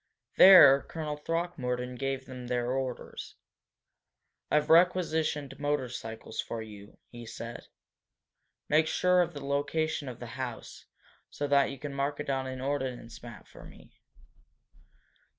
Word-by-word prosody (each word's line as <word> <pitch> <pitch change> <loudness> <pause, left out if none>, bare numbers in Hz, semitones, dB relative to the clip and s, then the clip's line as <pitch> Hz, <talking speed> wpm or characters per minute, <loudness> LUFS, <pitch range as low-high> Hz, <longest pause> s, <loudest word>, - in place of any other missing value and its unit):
There 180 -8 +9
Colonel 155 -1 -5
Throckmorton 150 -6 -3
gave 135 +1 -3
them 125 -2 -9
their 120 0 -1
orders. 130 -1 -5 1.1
"I've 150 0 +2
requisitioned 160 -5 +2
motorcycles 125 -7 -3
for 115 - -6
you," 105 -2 -11
he 120 -1 -10
said. 115 +1 -8 1.0
"Make 155 +1 +3
sure 180 +2 +3
of 175 -2 -2
the 140 -1 -7
location 145 +1 -1
of 125 - -9
the 120 - -7 0.2
house, 120 -3 -7 0.4
so 145 - -4
that 140 -1 +4
you 140 - -7
can 140 +1 -7
mark 140 +1 -2
it 145 - -3
on 135 -1 -2
an 130 0 -6
ordnance 130 -4 -4
map 115 -3 -11
for - - -14
me. - - -16
135 Hz, 135 wpm, -29 LUFS, 125-150 Hz, 1.1 s, There